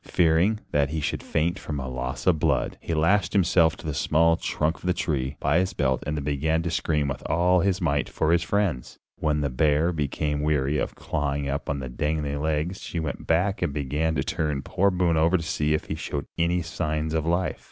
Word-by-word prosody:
Fearing 90 +6 +3
that 70 -1 +2
he 80 +1 -2
should 75 - -2
faint 85 +4 -1
from 75 - -5
loss 65 -1 -4
of 85 -4 +3
blood, - - +1
he 85 - -2
lashed 90 +6 +2
himself 85 -4 +4
to - - -12
the 75 - -2
small 80 +4 +3
trunk 80 0 -1
of - - -19
the 90 - +2
tree 70 -6 -1
by 75 +5 +2
his 95 +1 -1
belt 65 -6 0
and 75 +1 -1
then 75 - -3
began 80 +3 0
to 85 - -2
scream 75 -3 0
with 65 - -4
all 90 +2 +3
his 95 +1 +1
might 75 -5 0
for 80 0 0
his 85 0 +4
friends. 90 -10 -1 0.2
When 75 -1 +1
the 70 - 0
bear 75 +5 +2
became 75 -1 -1
weary 75 -1 +1
of - - -3
clawing 70 -2 -2
up 70 +1 -3
at 70 - -1
the 65 - -5
dangling 75 +2 -2
legs 80 +4 -1
she 85 - -4
went 80 -2 -4
back 90 +5 +1
and 70 - 0
began 75 +3 -1
to 70 - 0
turn 75 -3 -2
poor 100 +2 +2
Boone 90 -3 +1
over 85 +4 +4
to 85 - -5
see 75 -1 0
if 75 - -3
he - - -4
showed 75 -3 -4
any 85 +1 +1
signs 80 -2 -2
of 80 0 0
life. 85 +2 0
80 Hz, 220 wpm, -25 LUFS, 75-85 Hz, 0.2 s, himself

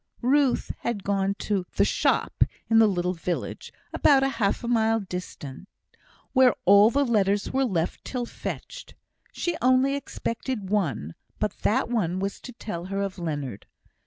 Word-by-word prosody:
Ruth 275 +1 +2
had 230 -5 -3
gone 195 0 0
to 195 -4 -1
"the - - +4
shop" - - +2 0.3
in 225 - +6
the 220 - +7
little 180 -2 0
village, 175 0 -4 0.2
about 275 -2 +4
half 235 -6 0
a - - -3
mile 225 -1 +2
distant, 180 -5 -7 0.7
where 260 -3 +5
all 200 +3 +7
letters 215 -7 +1
were 270 0 +2
left 175 -7 -2
till 250 -2 -3
fetched. - - -7 0.4
She 345 -1 -2
only 255 +2 +4
expected 230 -6 -4
one, 140 - -1 0.2
but 210 - -1
that 255 +6 +1
one 195 -7 0
was 195 +1 -3
to 250 - -8
tell 195 -7 -6
her 195 +1 -2
of 195 -1 -5
Leonard. 145 - -4
205 Hz, 150 wpm, -26 LUFS, 185-250 Hz, 0.7 s, the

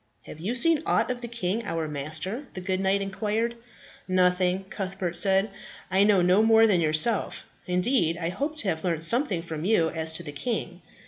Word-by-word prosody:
"Have 155 - -11
you 205 +9 -3
seen 315 +4 +1
aught - - 0
of 245 -1 -5
the 240 - -5
king, 230 -1 -3
our 165 -5 -3
master?" 160 - -3
the - - -4
good 185 0 -2
knight 195 +1 +1
inquired. 215 +4 -2 0.5
"Nothing," 185 0 +1
Cuthbert 190 -3 -4
said. 195 +3 +3 0.4
"I 190 +1 +4
know 200 -3 +3
no 180 +4 +4
more 225 0 +5
than 190 -6 +2
yourself. 160 +8 +1 0.2
Indeed, 180 -2 +1
I 170 -1 -3
hoped 285 - -4
to - - -6
have 160 -3 -3
learnt 165 -3 -1
something 215 - +3
from 160 -2 -6
you 175 -5 +2
as 160 -1 +1
to 170 - -4
the 150 - -7
king." 185 - -4
190 Hz, 190 wpm, -26 LUFS, 170-220 Hz, 0.5 s, more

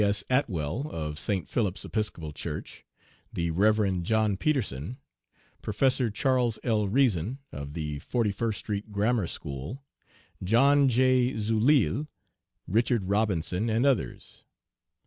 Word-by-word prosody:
S. 100 0 +1
Atwell, 115 - 0
of 75 - -4
St. 95 -7 -2
Philip's 105 -5 -1
Episcopal 105 -8 -3
Church; - - -6 0.5
the 85 -1 -1
Rev. 100 0 +2
John 110 +2 +1
Peterson; 120 - -1 0.6
Professor 125 +3 +1
Charles 125 0 +1
L. 110 -4 +1
Reason, 115 - +1
of 70 0 -7
the 75 -3 -4
Forty 115 - 0
first 110 +1 -2
Street 105 0 -4
Grammar 105 -1 +1
School; 70 - -6 0.6
John 135 +7 +4
J. 130 +1 +3
Zuilille; 110 - +2 0.6
Richard 115 -1 +1
Robinson, 100 0 0
and 115 +4 +2
others. 135 -6 -1
110 Hz, 115 wpm, -28 LUFS, 90-125 Hz, 0.6 s, John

